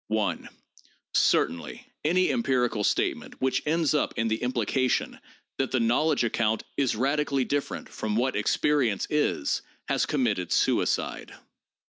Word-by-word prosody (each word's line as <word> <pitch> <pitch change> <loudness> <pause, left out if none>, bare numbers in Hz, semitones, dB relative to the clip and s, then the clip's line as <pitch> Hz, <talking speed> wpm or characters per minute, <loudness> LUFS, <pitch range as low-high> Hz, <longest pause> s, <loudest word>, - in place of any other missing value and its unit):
Certainly 85 - +1 0.2
any 180 +4 +2
empirical 125 - 0
statement - - -1
which 130 0 +1
ends 160 -1 +2
up 150 - 0
in 115 0 +1
the 110 +1 0
impli 125 -3 -1
cation 130 +1 0 0.4
that 135 - +1
the 130 - +1
knowledge 125 +6 +2
account 110 -1 0
is 135 -5 +1
radically 140 +2 0
different 145 -1 -3
'from 105 -1 -3
what 125 +3 +1
experience 120 0 +1
is' 150 - 0 0.3
has - - +1
committed 110 - 0
suicide. - - 0
130 Hz, 125 wpm, -27 LUFS, 115-145 Hz, 0.4 s, any